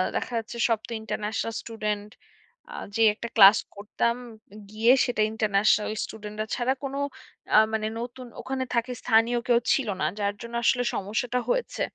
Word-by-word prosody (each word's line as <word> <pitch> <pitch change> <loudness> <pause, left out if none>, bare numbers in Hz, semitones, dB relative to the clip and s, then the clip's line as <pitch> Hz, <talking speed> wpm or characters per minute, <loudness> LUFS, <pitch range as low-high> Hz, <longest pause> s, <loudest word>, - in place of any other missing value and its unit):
দেখা - - -3
যাচ্ছে 225 +1 -8
সব 225 -2 +2
তো - - -12
ইন্টারন্যাশনাল 220 +1 -3
স্টুডেন্ট 210 -2 -4 0.6
আ - - -9 0.2
যে 225 - +1
একটা 235 +2 -6
ক্লাস 205 -1 +9 0.2
করতাম 210 +3 -1 0.5
গিয়ে 220 +3 +3
সেটা 245 -4 -1
ইন্টারন্যাশনাল 215 -1 +2
স্টুডেন্টরা 210 0 -6
ছাড়া 250 +1 +1
কোনো 275 0 -4 0.6
আ - - +8 0.2
মানে 215 -1 0
নতুন 245 +1 -7
ওখানে 265 0 -3
থাকে 235 +2 0
স্থানীয় 235 +1 +3
কেউ 240 -1 +4
ছিল 270 -5 0
না। - - +2
যার 200 0 0
জন্য 235 0 -9
আসলে 245 +2 +3
সমস্যাটা 230 +5 -1
হয়েছে। - - -1
225 Hz, 155 wpm, -26 LUFS, 210-240 Hz, 0.6 s, ক্লাস